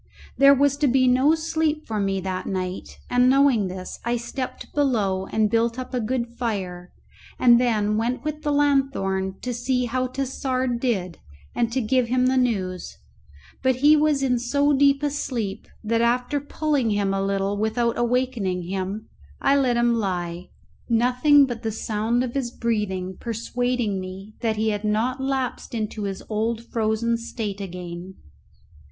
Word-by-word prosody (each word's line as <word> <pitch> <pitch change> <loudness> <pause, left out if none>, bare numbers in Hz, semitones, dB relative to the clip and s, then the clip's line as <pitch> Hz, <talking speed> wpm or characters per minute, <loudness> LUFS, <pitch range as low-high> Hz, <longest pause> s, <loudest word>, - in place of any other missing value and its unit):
There 275 0 +7
was 280 +1 +2
to 290 - +2
be 255 0 +3
no 260 +5 +4
sleep 315 -1 -1
for 215 -2 -3
me 195 -1 0
that 185 0 -4
night, 185 -1 -4
and 250 +1 +4
knowing 265 -6 +4
this, 185 0 -7
I 240 +1 0
stepped 255 +2 -6
below 205 -10 +1
and 220 -1 +1
built 230 +2 +1
up 255 0 -6
a 250 - 0
good 240 +2 -1
fire, 185 -7 -3 0.5
and 240 -1 +6
then 215 -3 +1
went 240 +4 -1
with 305 0 -4
the 295 - -1
lanthorn 270 -10 +1
to 250 - -2
see 250 +1 0
how 255 +2 -1
Tassard 255 -1 -2
did 190 -9 -1 0.3
and 235 -1 0
to 260 - 0
give 250 +2 +1
him 250 +1 +2
the 260 +1 +2
news; 195 -8 -1 0.6
but 260 -1 +2
he 300 +1 +8
was 300 -2 +2
in 250 -2 +2
so 285 +4 +2
deep 280 +1 +3
a 290 - +1
sleep, 235 -9 -3 0.2
that 230 +1 +1
after 245 +4 +1
pulling 290 -4 0
him 205 -2 +1
a 195 - 0
little 195 0 0
without 220 +3 0
awakening 240 -7 0
him 190 +4 -4 0.3
I 280 - +3
let 255 -4 +2
him 235 0 +3
lie, 180 -5 -2 0.4
nothing 250 +5 +5
but 240 -3 -5
the 225 - -2
sound 225 +3 -1
of 245 -2 -4
his 270 -4 -1
breathing 205 -6 -2
persuading 235 -2 -1
me 190 +3 -8
that 225 -2 0
he 220 +1 +1
had 205 0 -2
not 225 +5 0
lapsed 265 -3 -2
into 215 -1 -3
his 195 -1 -5
old 225 +1 -1
frozen 225 +1 0
state 220 -3 -5
again. 180 0 -7
235 Hz, 165 wpm, -24 LUFS, 205-260 Hz, 0.6 s, he